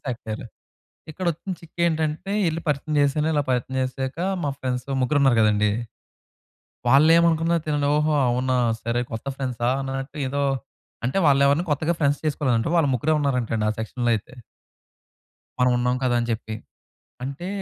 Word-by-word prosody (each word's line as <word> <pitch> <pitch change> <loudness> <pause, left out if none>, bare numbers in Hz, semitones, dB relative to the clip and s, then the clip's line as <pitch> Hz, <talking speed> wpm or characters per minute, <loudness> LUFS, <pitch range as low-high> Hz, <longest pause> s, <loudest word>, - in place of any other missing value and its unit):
అయిపోయారు. 110 -1 -6 0.7
ఇక్కడ 185 +4 -6
వచ్చిన 170 +5 -7
చిక్కు 165 +1 -16
ఏంటంటే 160 +3 -1 0.2
ఎళ్లి 165 +1 -2
పరిచయం 150 +1 -1
చేశాను 145 +2 +1
ఇలా 145 - +2
పరిచయం 125 +1 -1
చేశాక 130 +3 -3 0.2
మా 145 - 0
ఫ్రెండ్స్ 125 -1 -2 0.2
ముగ్గురు 135 +3 +2
ఉన్నారు 130 -4 +4
కదండీ! 105 -1 +3 1.2
వాళ్ళు 140 +5 +6
ఏమనుకున్నారు 170 0 +2
తినని, 145 -1 +1
"ఓహో! 150 +1 +2 0.2
అవునా 125 +1 0 0.3
సరే 115 +1 0
కొత్త 115 +4 -6
ఫ్రెండ్సా" 125 -3 -1
అన్నట్టు 135 +2 -5
ఏదో, 140 +2 -1 0.6
అంటే 130 - -1
వాళ్ళు 140 -1 +4
ఎవరిని 155 +6 +2
కొత్తగా 160 +4 +1
ఫ్రెండ్స్ 145 0 +2
చేసుకోలేదంటా 130 -6 +1
వాళ్ళు 155 -4 +3
ముగ్గురే 150 +6 +1
ఉన్నారంటండి 125 -6 0
ఆ - - +2
సెక్షన్‌లో 120 +2 -1
అయితే. 125 +5 -8 1.2
మనం 125 0 +4
ఉన్నాం 125 +1 +1
కదా 125 -1 +2
అని 120 - -2
చెప్పి. 110 -1 -4 0.7
అంటే 140 +7 -5
135 Hz, 150 wpm, -24 LUFS, 125-150 Hz, 1.2 s, వాళ్ళు